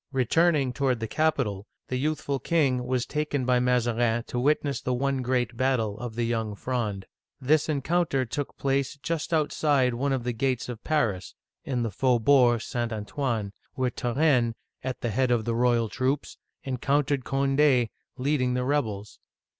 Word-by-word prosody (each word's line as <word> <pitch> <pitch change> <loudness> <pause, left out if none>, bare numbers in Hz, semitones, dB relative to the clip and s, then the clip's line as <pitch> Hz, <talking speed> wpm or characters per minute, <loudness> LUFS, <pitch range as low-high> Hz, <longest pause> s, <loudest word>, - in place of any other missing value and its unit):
Returning 140 +1 +2
toward 130 -3 0
the 115 - -2
capital, 115 -9 0 0.2
the 130 - -1
youthful 145 0 -1
king 130 -7 +1
was 125 -1 0
taken 150 -3 -2
by 125 0 +3
Mazarin 120 -2 +1
to 120 - -3
witness 145 +1 +1
the 125 - -1
one 135 +1 0
great 125 -1 0
battle 120 -5 0
of 120 -2 -6
the 120 - -1
Young 110 -3 -2
Fronde. 105 -5 -3 0.3
This 150 +4 +2
encounter 150 -1 +1
took 145 +4 -5
place 140 +1 0
just 165 0 -2
outside 145 -4 +2
one 135 +4 -1
of 130 -3 -1
the 125 0 -2
gates 130 +1 -1
of 115 -2 -7
Paris 115 -12 -1 0.3
(in 125 -3 -1
the 115 - -2
Faubourg 125 +1 +3
St. 120 -1 -3
Antoine), 110 -1 -3 0.2
where 130 -1 0
Turenne, 125 -2 +1 0.3
at 130 -1 -4
the 120 - -1
head 130 +4 +1
of 120 -3 +1
the 115 - 0
royal 120 -1 +2
troops, 130 +5 -2 0.2
encountered 140 +1 0
Cond6, 135 -3 +2 0.3
lead 140 +2 0
ing 125 0 +1
the 125 0 -1
rebels. 110 -8 -2
125 Hz, 160 wpm, -27 LUFS, 120-140 Hz, 0.3 s, by